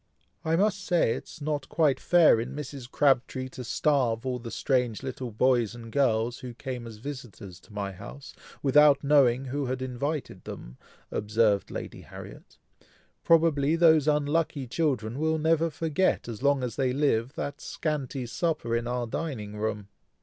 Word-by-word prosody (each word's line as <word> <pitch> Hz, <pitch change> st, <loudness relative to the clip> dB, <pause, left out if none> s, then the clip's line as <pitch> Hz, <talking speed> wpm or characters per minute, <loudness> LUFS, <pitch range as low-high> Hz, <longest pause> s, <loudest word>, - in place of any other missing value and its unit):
"I 160 Hz, +1 st, +1 dB
must 200 Hz, +2 st, +1 dB
say 175 Hz, -11 st, +2 dB
it -, -, -6 dB
was -, -, -13 dB
not 145 Hz, -3 st, -2 dB
quite 150 Hz, -5 st, +2 dB
fair 170 Hz, -9 st, +5 dB
in 120 Hz, -, -6 dB
Mrs. 140 Hz, -4 st, -7 dB
Crabtree 130 Hz, -2 st, +1 dB
to 130 Hz, -, -8 dB
starve 125 Hz, -3 st, +1 dB
all 125 Hz, -1 st, -2 dB
the 115 Hz, -1 st, -7 dB
strange 125 Hz, -3 st, 0 dB
little 130 Hz, -1 st, -5 dB
boys 120 Hz, 0 st, +2 dB
and 115 Hz, -1 st, -10 dB
girls, 120 Hz, -3 st, +1 dB
who 125 Hz, -2 st, -8 dB
came 125 Hz, -2 st, -6 dB
as 110 Hz, -2 st, -9 dB
visitors 115 Hz, -7 st, -8 dB
to 110 Hz, -, -20 dB
my 100 Hz, -1 st, -3 dB
house, 100 Hz, +9 st, -10 dB, 0.3 s
without 145 Hz, 0 st, +5 dB
knowing 135 Hz, -3 st, +4 dB
who 135 Hz, +1 st, -2 dB
had 130 Hz, +1 st, -2 dB
invited 130 Hz, +4 st, -4 dB
them," -, -, -9 dB, 0.3 s
observed 105 Hz, -1 st, +1 dB
Lady -, -, -7 dB
Harriet. -, -, -12 dB, 0.7 s
"Probably 160 Hz, -2 st, +4 dB
those 160 Hz, -3 st, +5 dB
unlucky 150 Hz, -1 st, +1 dB
children 125 Hz, -3 st, -1 dB
will 160 Hz, +1 st, +1 dB
never 160 Hz, +1 st, +2 dB
forget, 160 Hz, +1 st, 0 dB
as 115 Hz, -1 st, -6 dB
long 140 Hz, -1 st, +2 dB
as 125 Hz, -, -4 dB
they 130 Hz, -2 st, +1 dB
live, 130 Hz, -3 st, +1 dB
that 145 Hz, 0 st, -5 dB
scanty 140 Hz, -5 st, -3 dB
supper 120 Hz, -3 st, -1 dB
in 115 Hz, 0 st, -1 dB
our 120 Hz, 0 st, -1 dB
dining 110 Hz, -5 st, -4 dB
room." 105 Hz, -1 st, -3 dB
130 Hz, 165 wpm, -27 LUFS, 115-150 Hz, 0.7 s, fair